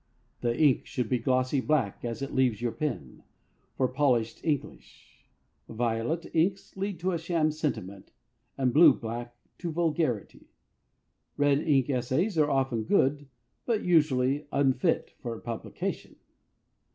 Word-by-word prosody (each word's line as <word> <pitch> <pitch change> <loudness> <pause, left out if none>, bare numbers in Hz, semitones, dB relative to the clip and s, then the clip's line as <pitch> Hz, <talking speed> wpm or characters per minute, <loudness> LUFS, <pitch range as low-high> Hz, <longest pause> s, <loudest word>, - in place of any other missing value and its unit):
The 120 0 -1
ink 145 -5 +3
should 125 -4 -3
be 125 - +1
glossy 130 +2 +1
black 130 -9 0
as 120 +2 -4
it 135 - -5
leaves 125 -5 +2
your 120 -1 -1
pen, 125 - -4 0.6
for 130 - +2
polished 125 -4 0
English. 150 -4 -5 0.4
Violet 115 +8 -1
inks 185 +4 0
lead 195 -2 -3
to 185 0 0
sham 165 -2 +1
sentiment, 120 - -4 0.5
and 130 -3 +1
blue 165 +4 +8
black 120 +1 -6 0.2
to 175 -2 -3
vulgarity. 160 - -1 0.9
Red 145 -1 +3
ink 140 -5 +2
essays 135 - 0
are 150 -1 +4
often 130 -5 0
good, 140 +5 +2 0.4
but 230 -3 +1
usually 145 -4 +2
unfit 140 +5 +1
for 115 -2 -5
publication. 115 -2 -5
135 Hz, 125 wpm, -28 LUFS, 120-155 Hz, 0.9 s, blue